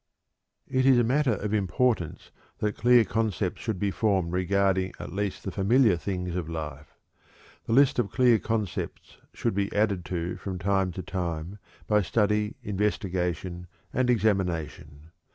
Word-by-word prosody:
It 130 0 +1
is 130 -2 +6
a 120 - +4
matter 130 0 +2
of 105 +2 -3
importance 105 -2 0 0.3
that 105 -1 -1
clear 120 0 +5
concepts 105 -2 -1
should 110 -5 -2
be 100 +2 0
formed 95 -5 +1
regarding 95 +1 +1
at 85 0 -7
least 100 0 -3
the 95 - -4
familiar 105 +2 +3
things 90 0 -4
of 85 -3 -3
life. 75 -3 -6 0.7
The 115 - -1
list 135 0 +5
of 110 -5 +1
clear 120 +1 +4
concepts 110 -4 -4 0.2
should - - -1
be 100 0 -1
added 105 -4 +1
to 90 -1 -3
from 95 -2 -5
time 95 0 +1
to 95 - -6
time 85 +1 -4 0.3
by 105 -1 +3
study, 105 +2 +1
investigation, 90 -4 -2 0.3
and 130 0 +1
examination. 90 -8 -1
100 Hz, 150 wpm, -27 LUFS, 90-110 Hz, 0.7 s, is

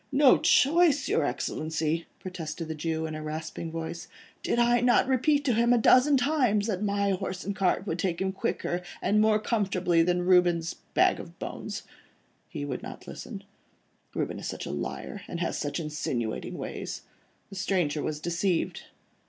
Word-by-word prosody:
"No 275 -1 +6
choice, 295 0 +4
your 160 - +2
Excellency?" 155 +4 -2
protested 165 -3 -6
the 160 - -3
Jew, 160 +1 -2
in 155 - -4
a 155 - -5
rasping 155 +1 -5
voice, 165 +1 -5 0.3
"did - - 0
I 240 0 +4
not 245 +1 +4
repeat 285 +3 +2
to 250 - +3
him 235 +2 +3
a - - +5
dozen 255 +5 +5
times, 250 -6 +2
that 205 -4 -2
my 200 -1 +1
horse 190 -1 -3
and 200 0 -3
cart 190 0 +1
would 180 -3 -3
take 175 -1 -1
him 190 0 0
quicker, 180 -2 -2 0.2
and 210 +3 +2
more 215 0 +4
comfortably 190 -6 +1
than 180 +1 +1
Reuben's 175 -2 +3 0.2
bag - - +4
of - - -10
bones. - - -6 0.7
He 145 - -5
would 130 -3 -4
not - - -9
listen. - - -8 0.7
Reuben - - -2
is - - -5
such - - -5
a - - -4
liar, 65 +2 -5
and 170 - -5
has 170 - -1
such 145 +1 -2
insinuating 145 -8 -3
ways. - - -5 0.5
The - - -8
stranger 180 -6 0
was 150 0 -3
deceived. 175 +2 -1
180 Hz, 170 wpm, -28 LUFS, 160-220 Hz, 0.7 s, No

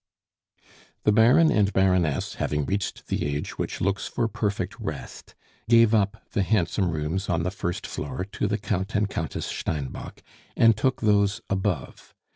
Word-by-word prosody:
The 105 - +4
Baron 120 +9 +5
and 100 -1 +3
Baroness, 90 -6 +2
having 75 -1 0
reached 100 +3 -3
the - - -2
age 70 0 -3
which - - -3
looks 100 +1 0
for 120 -2 -1
perfect 105 -2 -3
rest, - - -7 0.3
gave 115 -1 +6
up 105 0 +1
the 105 - +1
handsome 95 -2 +1
rooms 80 +5 -2
on 85 -2 +1
the 90 - -1
first 90 -2 -4
floor 90 - -4
to - - -1
the 105 +1 0
Count 100 -1 -2
and 105 0 +2
Countess 80 -8 -4
Steinbock, 75 -4 -5 0.3
and 115 -1 +6
took 130 +5 0
those 105 -2 +2
above. 95 -7 -3
100 Hz, 155 wpm, -25 LUFS, 90-105 Hz, 0.3 s, gave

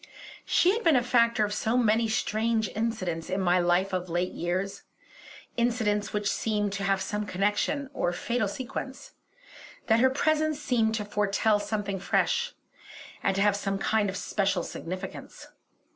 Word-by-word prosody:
She 360 - +4
had 460 - -2
been 330 -4 +5
a 245 - +3
factor 235 -3 +3
of 205 - -3
so 220 +3 0
many 225 -1 +3
strange 220 0 0
incidents 185 -7 -3
in 190 +1 -1
my 180 -1 +3
life 175 +2 +2
of 180 -1 -2
late 175 +2 -1
years 185 +3 -3 0.8
incidents 220 -3 +1
which 210 -1 -1
seemed 210 -2 0
to 200 0 -3
have 195 0 +2
some 210 +2 -2
connection 205 +10 0
or 175 - 0
fatal 220 +5 -1
sequence 265 - -6 0.7
that 225 0 +3
her 260 +2 +5
presence 310 +2 +1
seemed 235 -6 +1
to 210 -2 -3
foretell 205 +1 +1
something 205 -2 -3
fresh, 475 - +1 0.7
and 195 - +1
to 195 - +2
have 205 -1 +3
some 195 -1 -2
kind 205 +1 +1
of 190 - -4
special 195 -3 0
significance. 185 +3 -7
210 Hz, 160 wpm, -28 LUFS, 195-235 Hz, 0.8 s, been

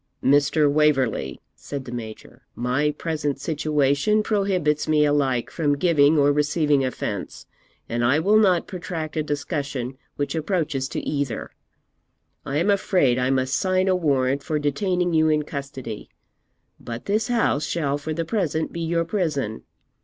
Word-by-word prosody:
'Mr. 145 +2 +4
Waverley,' 140 - +1
said 140 -2 -7
the 120 - -8
Major, 110 -3 -8
'my 130 +5 0
present 150 -2 -3
situation 150 +6 +1
prohibits 190 -8 0
me 150 -1 +4
alike 135 -4 +1
from 145 -3 0
giving 155 -2 +4
or 145 0 +4
receiving 150 -1 +2
offence, 105 -6 -4 0.4
and 120 +1 -1
I 130 +5 +4
will 205 +7 +4
not 185 -5 +3
protract 170 -4 -5
a 155 - +1
discussion 140 -4 -3 0.2
which 145 - -2
approaches 155 -5 -1
to - - -3
either. 140 -6 -2 1.0
I 140 - -1
am 180 +6 +2
afraid 180 -10 +2
I 125 +1 +1
must 130 0 +1
sign 185 0 +1
a 185 - +3
warrant 140 -5 +1
for 155 +2 -2
detaining 175 +4 0
you 160 0 +4
in 150 -1 +2
custody, 135 -6 -7 0.7
but 120 0 -7
this 215 +3 0
house 230 - +1
shall 145 -4 -1
for 155 +2 -5
the 165 +1 -2
present 160 -5 -1
be 170 - -4
your 165 0 0
prison. 150 - -2
150 Hz, 150 wpm, -23 LUFS, 135-165 Hz, 1.0 s, Mr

